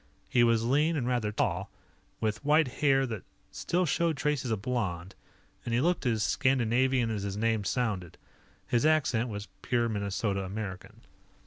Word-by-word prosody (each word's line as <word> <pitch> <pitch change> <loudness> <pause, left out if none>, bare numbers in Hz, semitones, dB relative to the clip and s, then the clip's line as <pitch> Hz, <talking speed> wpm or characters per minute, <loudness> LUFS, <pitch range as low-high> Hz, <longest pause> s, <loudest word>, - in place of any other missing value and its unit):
He 120 - +3
was 115 -1 +3
lean 150 +6 +2
and 125 -4 -1
rather 120 -4 0
tall, 95 -2 -1 0.5
with 110 +1 -2
white 150 +1 +4
hair 135 -2 +4
that 110 -6 -5 0.3
still 180 +1 0
showed 165 0 +1
traces 140 -1 -1
of 110 -3 -2
blond, 100 -7 -2 0.5
and 120 -1 -1
he - - +3
looked 170 -1 +1
as 110 -3 +1
Scandinavian 130 -1 +2
as 105 -2 -2
his 100 0 -4
name 110 -1 +1
sounded. 100 -6 -2 0.5
His 120 +1 +1
accent 135 -7 +2
was 105 -1 -6
pure 120 -1 +1
Minnesota 100 -1 -1
American. 95 -1 -6
115 Hz, 155 wpm, -29 LUFS, 105-135 Hz, 0.5 s, white